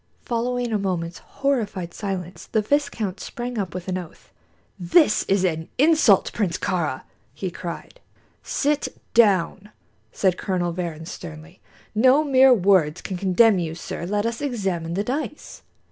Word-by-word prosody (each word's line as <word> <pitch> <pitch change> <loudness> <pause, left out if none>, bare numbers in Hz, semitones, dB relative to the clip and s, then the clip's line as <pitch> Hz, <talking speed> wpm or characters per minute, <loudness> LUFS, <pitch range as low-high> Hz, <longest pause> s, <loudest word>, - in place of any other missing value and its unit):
Following 245 0 -1
a 210 - +1
moment's 175 -3 -3
horrified 215 -11 -2
silence, 185 -3 -5
the 220 - 0
viscount 220 -7 -1
sprang 240 +2 -5
up 185 -3 -4
with 185 0 -6
an 185 0 -1
oath. 175 -3 -12 0.5
"This 210 - +4
is 195 -1 +2
an 160 -3 -1
insult, 295 - +4
Prince 185 -6 -1
Kāra!" 160 -8 -2 0.3
he 190 -2 -4
cried. 175 - -7 0.4
"Sit 295 0 0 0.3
down," 205 -2 +3 0.4
said 185 -2 +1
Colonel 180 -2 -1
Varrin, 165 -3 -5
sternly. 170 0 -10 0.3
"No 255 +7 +5
mere 265 -2 +6
words 185 -8 +3
can 190 - -5
condemn 195 +3 +4
you, 160 -2 -3
sir. 170 +1 -6
Let 205 +2 0
us 230 +2 -2
examine 190 - -2
the 200 - 0
dice." 290 +5 -5
195 Hz, 145 wpm, -23 LUFS, 175-235 Hz, 0.5 s, mere